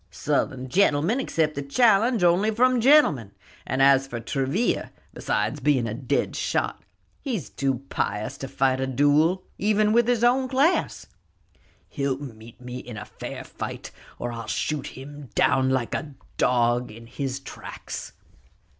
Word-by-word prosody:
"Southern 130 0 -1
gentlemen 175 - +2
accept 160 - 0
a - - -2
challenge 220 - +3
only 175 +5 +4
from 250 +2 +3
gentlemen; 220 - +4 0.3
and 135 +1 +1
as 135 0 +5
for 120 -3 -5
Travilla, 135 - -1 0.2
besides - - -1
being 140 -5 +2
a 105 - -3
dead 125 +2 -1
shot, - - -1 0.4
he's 220 - -4
too 135 -2 -1
pious 105 +1 -2
to 135 - -5
fight 130 0 +1
a 130 - -1
duel, 145 +7 +3 0.2
even 210 +1 +2
with 235 0 +4
his 240 -2 +1
own 255 +2 +3
class." 275 +7 +1 0.8
"He'll 140 -2 -2
meet 115 -5 -11
me 125 0 -7
in 120 -3 -9 0.2
fair - - -6
fight, - - -7 0.3
or 120 - -4
I'll 115 -2 -7
shoot 150 +6 -2
him 140 0 -10
down, 130 0 +3
like 130 -3 0
a 145 -2 -4 0.2
dog, 120 0 +2
in 115 +2 -12
his 135 +2 -4
tracks." 135 - -8
140 Hz, 145 wpm, -25 LUFS, 125-210 Hz, 0.8 s, as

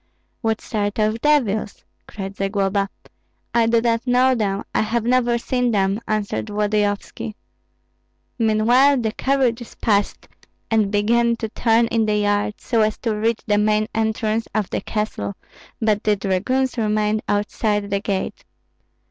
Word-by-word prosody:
"What 225 -2 0
sort 205 -2 -2
of 215 +1 +1
devils?" 225 -9 +1 0.3
asked 195 -1 -5
Zagloba. 195 0 0 0.6
"I 235 -1 +3
do 230 0 +3
not 230 +1 0
know 250 +1 +4
them, 205 -4 -1
I - - +2
have 220 +1 0
never 240 0 +2
seen 250 +1 0
them," 195 -2 +1
answered 205 - -2
Volodyovski. 210 0 -1 1.0
Meanwhile 235 +6 +4
the 220 -2 -1
carriages 250 -2 0
passed, 205 -2 0 0.4
and 215 -3 +3
began 235 +3 +2
to 225 -1 -5
turn 230 +1 +2
in 225 -2 +1
the 210 0 +2
yard 205 0 0
so 230 -2 0
as 215 -1 +1
to 225 -3 -1
reach 225 +1 0
the 205 -1 +2
main 215 0 +2
entrance 220 0 -1
of 215 -3 -1
the - - -1
castle, 155 - -3 0.4
but 215 -2 +1
the 210 -1 +3
dragoons 230 +7 0
remained 215 0 +1
outside 205 0 0
the 200 - +1
gate. 195 -2 -3
215 Hz, 145 wpm, -21 LUFS, 205-230 Hz, 1.0 s, know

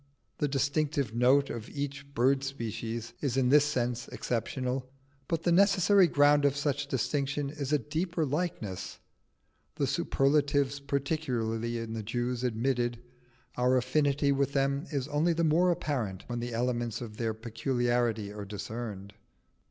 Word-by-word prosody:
The 145 - +2
distinctive 140 -2 0
note 130 +4 +4
of 115 -2 -6
each 140 -1 -5
bird 135 +3 +3
species 115 -3 -4
is 135 -3 -1
in 130 -2 +3
this 145 +1 +6
sense 125 -4 -1
exceptional, 130 +2 -3 0.4
but 165 -2 -1
the 175 - +2
necessary 195 +1 +5
ground 145 -1 +4
of 140 0 +2
such 145 -1 -1
distinction 140 +2 -1
is 145 -2 -4
a 150 - +5
deeper 160 +4 -2
likeness. 145 - -3 0.8
The 140 - 0
superlative 140 -1 +1
peculiarity 125 -6 -1
in 115 -1 -5
the 110 - -3
Jews 120 +3 -2
admitted, 120 0 0 0.6
our 125 +1 +3
affinity 140 +2 +2
with 140 0 +1
them 140 +3 0
is 140 -3 -1
only 155 +4 +2
the 170 +1 0
more 165 +3 +4
apparent 125 - -2
when 120 -1 -4
the 120 +1 -4
elements 120 -1 -1
of 110 -3 -8
their 115 -2 -1
peculiarity 115 -2 -1
are 105 -1 -6
discerned. 105 -1 -6
135 Hz, 145 wpm, -30 LUFS, 120-145 Hz, 0.8 s, this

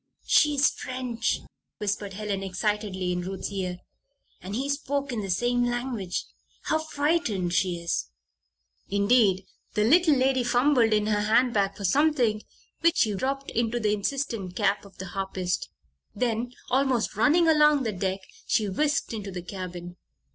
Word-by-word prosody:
"She 295 -1 +4
is 285 +2 +4
French," 250 -2 -2 0.4
whispered 205 -1 -3
Helen, 200 -1 -3
excitedly, 195 -1 -2
in 180 0 -1
Ruth's 190 +2 -5
ear. 185 -2 -3 0.6
"And 195 +3 -5
he 265 +4 -1
spoke 280 -1 -2
in 230 -3 -2
the 195 - -5
same 245 +6 +1
language. 240 -6 -2 0.4
How 315 - +1
frightened 290 - 0
she 180 -1 +1
is!" 170 - -2 0.8
Indeed, 200 -2 +3 0.3
the 210 - +3
little 315 +6 +5
lady 260 -1 +2
fumbled 245 -1 +3
in 210 -1 +2
her 210 -1 +1
handbag 215 -2 +2
for 200 - -4
something 250 - +2 0.4
which 335 +1 +3
she 215 - +3
dropped 270 +6 -2
into 235 +1 0
the 210 -2 +1
insistent 210 -3 -2
cap 200 -1 +1
of 200 - -16
the 190 - -6
harpist. 190 -1 -3 0.5
Then, 235 +2 -1 0.2
almost 260 -4 +1
running 305 - +4
along 300 -3 +5
the 225 - -1
deck, 190 0 -2 0.3
she 215 - +2
whisked 290 +7 0
into 205 -3 -5
the 180 -2 -6
cabin. 175 -1 -7
220 Hz, 150 wpm, -26 LUFS, 195-260 Hz, 0.8 s, little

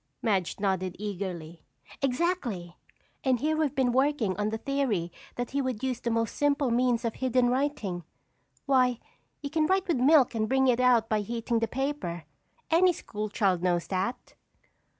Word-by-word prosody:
Madge 195 -6 0
nodded 190 -2 -1
eagerly. 180 -5 -5 0.4
"Exactly. 250 - -1 0.5
And 260 -4 +2
here 310 +4 +1
we've 305 -2 0
been 260 -2 +2
working 260 -6 +1
on 210 0 0
the 220 - -2
theory 235 -10 -1 0.2
that 245 -1 -4
he 280 +1 0
would 255 -4 -3
use 255 -2 -1
the 235 - -2
most 230 0 -1
simple 285 -3 +1
means 240 0 +2
of 230 - -1
hidden 255 -1 +1
writing. 250 -10 -1 0.6
Why, 255 -3 +3 0.4
you 285 - -4
can 310 -1 +2
write 380 +1 +1
with 335 - +1
milk 270 +1 +5
and 220 -1 -1
bring 265 0 +3
it 245 -1 +3
out 245 -3 +4
by 215 -1 +1
heating 230 +2 -1
the 230 - 0
paper. 250 - -3 0.5
Any 355 +2 +5
school 215 -8 -5
child 190 -4 +1
knows 175 -1 +1
that." 195 +6 -3
240 Hz, 170 wpm, -28 LUFS, 205-275 Hz, 0.6 s, milk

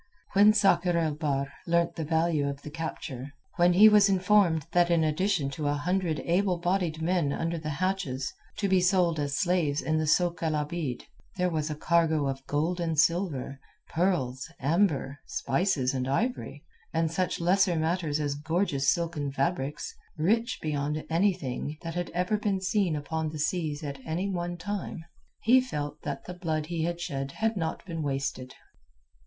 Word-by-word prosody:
When 205 +2 +7
Sakr 180 -4 +3
el 160 -2 +1
Bahr 140 -3 -2
learnt 170 0 +2
the 160 - -3
value 160 -2 +1
of 140 0 -7
the 150 - -7
capture, 145 -4 -6 0.2
when 175 +1 +5
he 205 +5 +8
was 210 -1 +6
informed 185 -5 +3
that 175 -1 +3
in 170 -2 +3
addition 155 -2 +1
to 145 +1 -3
a 145 - +1
hundred 175 0 0
able 180 +1 +1
bodied 175 -2 -1
men 170 -4 +1
under 165 +3 -2
the 155 -1 -5
hatches, 150 -5 -2 0.2
to 205 - 0
be 190 -1 +3
sold 180 -3 +3
as 140 -1 -1
slaves 170 -5 +1
in 155 0 0
the 155 - 0
sôk 175 +2 +2
el 160 -2 0
Abeed, 150 -3 -3 0.3
there 180 -1 +1
was 155 -1 -1
a 150 - -3
cargo 160 -2 +2
of 135 0 -3
gold 160 +5 0
and 165 -2 -1
silver, 160 -5 +1 0.3
pearls, 160 -7 0
amber, 145 -2 +1
spices, 135 -4 0
and 130 -1 -2
ivory, 145 - -2 0.3
and 165 -1 0
such 185 +2 -1
lesser 180 +1 +3
matters 160 -2 0
as 145 -2 -1
gorgeous 150 -2 0
silken 165 -4 -1
fabrics, 140 +1 -2 0.2
rich 225 +8 +1
beyond 150 0 -2
anything 165 -5 0
that 165 0 -4
had 175 +1 -3
ever 180 +4 0
been 205 -2 0
seen 190 -3 +1
upon 155 +2 -2
the 155 - -7
seas 155 -1 -1
at 140 -2 -5
any 165 +6 -2
one 175 -2 -3
time, 180 -2 -5 0.4
he 255 +3 +6
felt 150 - -5
that 140 -2 -5
the 180 - -6
blood 160 -4 -2
he 165 0 -2
had 170 0 -2
shed 135 -6 -4
had 225 0 0
not 165 -4 -3
been 165 -3 -4
wasted. 135 -2 -3
165 Hz, 170 wpm, -28 LUFS, 145-180 Hz, 0.4 s, he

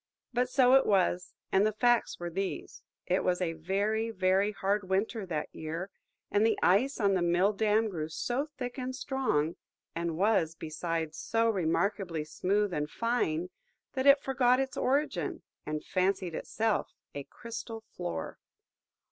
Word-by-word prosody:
But 250 +1 +1
so 255 -1 +5
it 270 0 +6
was, 180 -3 +2 0.2
and 190 +1 +4
the 215 - +3
facts 240 +2 +2
were 175 0 -4
these. 195 +3 -4 0.2
It 185 +1 +1
was 180 -1 +1
a 175 -3 -1
very, 200 +7 -1
very 195 0 +2
hard 200 -1 -1
winter 200 +2 0
that 155 -4 -3
year, 165 +5 -5 0.4
and 205 - +3
the 225 -1 +3
ice 235 +11 +3
on 200 -2 +3
the 185 - +1
mill 175 +4 +3
dam 215 +1 +2
grew 160 -6 -4
so 245 - -2
thick 250 +1 -5
and 255 0 -3
strong, 255 - 0 0.4
and 165 -1 -2
was, 185 -5 +2
besides, 160 0 -3
so 230 0 +2
remarkably 180 -2 0
smooth 200 +5 0
and 150 -1 -1
fine, 180 -8 -1 0.4
that 265 0 0
it 280 0 +7
forgot 255 -1 +3
its 265 -1 -2
origin, 285 +4 0 0.2
and 150 0 -3
fancied 185 -1 0
itself 220 +6 -1 0.2
a 140 - -5
crystal 230 -1 -7
floor. 80 -2 -4
200 Hz, 155 wpm, -30 LUFS, 175-230 Hz, 0.4 s, it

